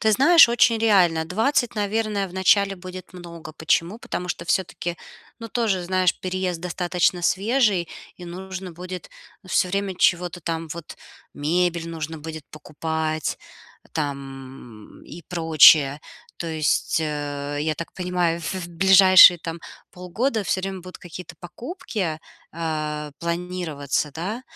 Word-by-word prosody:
Ты 220 -1 +3
знаешь, 320 +4 +7
очень 235 -1 +3
реально. 180 -8 +3
20, 230 - 0
наверное, 210 -1 -1
вначале 195 +2 +2
будет 185 0 -10
много. 170 -3 -10
Почему? 165 +6 0
Потому 180 -5 -5
что 170 - -4
всё-таки, 175 -1 -2 0.4
ну 230 -1 -8
тоже, 215 -6 0
знаешь, 185 0 +2
переезд 185 -2 -3
достаточно 180 0 0
свежий, 200 -3 +1 0.3
и - - -8
нужно 185 +1 -7
будет 180 +1 -8 0.4
всё 185 - +1
время 195 0 -2
чего-то 175 0 +1
там 165 0 -4
вот: 170 -2 -9 0.4
мебель 170 +2 0
нужно 160 -1 -5
будет 160 0 -8
покупать 155 +1 -3 0.5
там 135 -6 -7
и 170 +1 -11
прочее. 155 -4 +5 0.4
То 170 - -5
есть, 155 0 0
э, 145 -1 -4
я 155 0 0
так 170 - -7
понимаю, 180 -2 -1
в 165 - -4
в 175 - -7
ближайшие 185 0 +7
там 165 0 -6 0.3
полгода 215 +7 -2
всё 185 - 0
время 195 0 -4
будут 180 +1 -10
какие-то 175 0 -10
покупки, 195 - -5 0.3
а, 155 -2 -3
планироваться, 170 -4 -3
да? 195 - -5
175 Hz, 130 wpm, -23 LUFS, 160-190 Hz, 0.5 s, знаешь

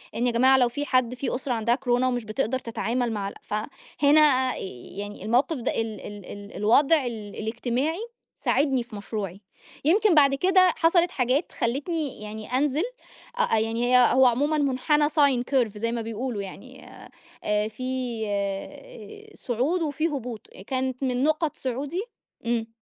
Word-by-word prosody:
إن 240 +2 +1
يا - - +2
جماعة 260 +3 +5
لو 245 -2 +3
في 285 +4 -4
حد 255 -3 +1
في 255 0 -2
أسرة 255 0 -2
عندها 235 +1 +1
كورونا 250 -1 +1
ومش 245 -2 -1
بتقدر 245 +3 -1
تتعامل 235 +1 -2
مع 200 -2 -3
ال - - -11
فهنا 265 +4 +2
يعني 200 +7 -8
الموقف 255 +8 +2
ده 240 - -1
ال 220 -2 -5
ال 205 -2 -9
ال 205 +1 -10
الوضع 275 +8 +4
ال 215 -4 -6
الإجتماعي 245 - -2 0.4
ساعدني 270 -4 +1
في 235 -2 -12
مشروعي، 200 -2 -5 0.4
يمكن 395 +2 +4
بعد 280 -2 +5
كده 370 +4 +4
حصلت 340 +1 +3
حاجات 255 +5 0
خلّتني 280 +2 -2
يعني 215 +1 -7
أنزل 290 +4 +1 0.5
أ 485 - 0 0.2
أ - - +3
يعني 235 +3 +2
ه 245 - +5
هو 260 0 +6
عمومًا 285 +6 +2
منحنى 295 +2 +2
sine 285 -5 +3
curve 240 -7 +1
زي 230 +2 -1
ما 235 -1 -2
بيقولوا 225 0 -4
يعني، 255 +7 -10
آآ - - -13 0.3
آآ 210 0 +1
فيه 250 -1 -3 1.1
صعود 265 +9 -1
وفيه 310 +1 -1
هبوط 240 -5 -6 0.2
كانت 260 0 -2
من 255 0 0
نقط 310 0 +1
صعودي 275 +7 -3 0.4
إمم. 230 -1 0
250 Hz, 160 wpm, -25 LUFS, 225-285 Hz, 1.1 s, هو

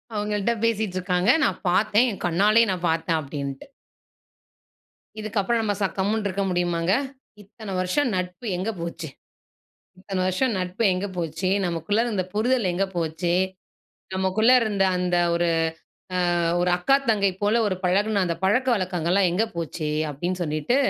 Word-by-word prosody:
அவுங்கள்ட்ட 210 +1 0
பேசிட்டு 220 -4 0
இருக்காங்க. 180 +2 0
"நான் - - 0
பாத்தேன். 215 +6 +3
என் 200 - -8
கண்ணாலயே 205 +7 +4
நான் 180 -1 -3
பாத்தேன்." 165 0 0
அப்பிடின்ட்டு. 140 -2 -6 1.6
இதுக்கப்புறம் 215 +2 0
நம்ம 205 -2 0
ச - - +2
கம்முன்னு 205 +2 0
இருக்க 195 +1 -2
முடியுமாங்க? 175 0 0 0.5
"இத்தன 205 0 -9
வருஷம் 185 +11 +1
நட்பு 180 +5 -4
எங்க 190 +5 -2
போச்சு? 170 -1 -5 0.9
இத்தன 190 0 -3
வருஷம் 230 +7 +1
நட்பு 185 +5 -3
எங்க 185 +2 -2
போச்சு? 165 +2 -2 0.2
நமக்குள்ள 175 +5 0
இருந்த 210 -6 -1
புரிதல் 225 -1 +1
எங்க 195 +3 +1
போச்சு? 165 +1 -1 0.8
நமக்குள்ள 190 +5 +2
இருந்த 205 -4 +1
அந்த 180 0 0 0.2
ஒரு, 170 0 +1 0.9
அ - - +1 0.2
ஒரு 180 0 +2
அக்கா, 270 +10 +4
தங்கை 200 -3 +2
போல 215 +3 +3
ஒரு 190 -2 -1
பழகுன 200 +3 +2
அந்த 170 -1 -2
பழக்க 235 +7 +2
வழக்கங்கள்லாம் 185 -1 +1
எங்க 200 +6 +2
போச்சு?" 165 -1 -3 0.2
அப்பிடின்னு 175 +6 -3
சொல்லிட்டு, 155 - 0
185 Hz, 140 wpm, -24 LUFS, 175-210 Hz, 1.6 s, கண்ணாலயே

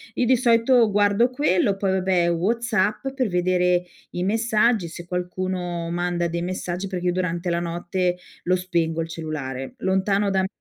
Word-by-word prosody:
Io 250 - +1
di 255 +2 +5
solito 235 -1 +4
guardo 205 +4 +3
quello, 205 -7 +1
poi 195 -1 0
vabbè 185 -2 +2
WhatsApp, 215 +5 0
per 255 -4 +1
vedere 180 0 +2 0.3
i 175 - -3
messaggi 220 -2 +2
se 170 +1 -9
qualcuno 180 -1 -3
manda 175 0 -1
dei 170 +1 -3
messaggi, 180 +1 -3
perché 180 -2 -4
io - - +3
durante 175 -1 -2
la 170 0 0
notte 175 +1 -1 0.3
lo 180 - +2
spengo 170 -3 -1
il 165 - -3
cellulare. 145 -5 -5
Lontano 195 +2 +1
da 190 - +2
me 190 - 0
185 Hz, 165 wpm, -23 LUFS, 175-205 Hz, 0.3 s, di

